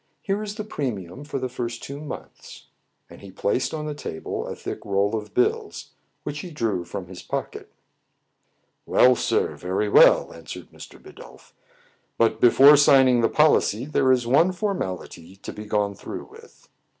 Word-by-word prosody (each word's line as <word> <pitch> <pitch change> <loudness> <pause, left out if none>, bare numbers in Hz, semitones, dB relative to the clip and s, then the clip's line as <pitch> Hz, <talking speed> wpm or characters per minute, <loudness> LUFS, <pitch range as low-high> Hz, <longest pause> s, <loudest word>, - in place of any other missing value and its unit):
Here 200 +1 -1
is 210 -1 -5
the 215 - -5
premium 125 - -5
for 145 -1 -5
the 130 -1 -2
first 120 -2 -5
two 140 +1 -7
months." 150 - -10 0.4
And - - -15
he 100 - -11
placed 100 +6 -1
on 155 -1 -5
the 150 - -4
table 80 - -6
a - - -5
thick - - -7
roll 100 +2 0
of 105 -1 -6
bills, 125 - -1 0.3
which 145 0 -5
he 180 - -7
drew 115 - -2
from 90 +2 -6
his 90 0 -11
pocket. - - -6 1.2
"Well, 125 0 +5
sir, - - 0
very 95 +4 -2
well," - - +5
answered 85 -1 -10
Mr. - - -13
Bidulph. - - -15 0.3
" - - -38
But, 115 - +1
before 140 +4 +7
signing 130 -4 +5
the 115 - +2
policy, 140 -6 +2
there 135 -3 +2
is 125 -2 +2
one 165 +10 +3
for 200 +3 -1
mality 90 - -6
to 100 - -9
be 105 - -9
gone 105 -1 0
through - - -8
with." - - -17
125 Hz, 175 wpm, -24 LUFS, 100-145 Hz, 1.2 s, before